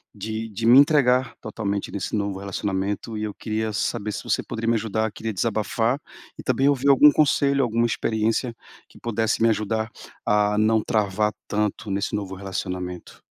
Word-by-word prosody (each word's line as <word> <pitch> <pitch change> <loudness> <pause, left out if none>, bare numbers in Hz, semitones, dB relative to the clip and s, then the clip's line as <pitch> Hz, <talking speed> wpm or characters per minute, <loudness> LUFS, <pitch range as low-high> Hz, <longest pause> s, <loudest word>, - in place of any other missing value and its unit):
de 110 +1 -4
de 110 +2 -4
me 120 +3 +8
entregar 130 -4 +3
totalmente 100 -2 -3
nesse 100 +1 -3
novo 100 -2 -2
relacionamento 100 +2 -3
e 105 - -3
eu 105 -2 -3
queria 110 -1 -3
saber 105 +1 -2
se - - -5
você - - 0
poderia 115 0 -3
me 115 - +3
ajudar, 110 0 -1
queria 110 +1 -5
desabafar. 115 +4 0 0.4
E - - -7
também 135 +2 +2
ouvir 140 0 +1
algum 145 +2 +8
conselho 140 -1 +3
alguma 115 -1 +1
experiência 115 +1 0 0.3
que - - -19
pudesse 115 -1 -1
me 115 - +5
ajudar 110 +1 -1 0.3
a 105 0 +2
não 110 +1 +3
travar 105 0 0 0.2
tanto 105 0 -1
nesse 100 +1 -1
novo 100 -2 -4
relacionamento. 90 -2 -5
110 Hz, 165 wpm, -24 LUFS, 100-115 Hz, 0.4 s, me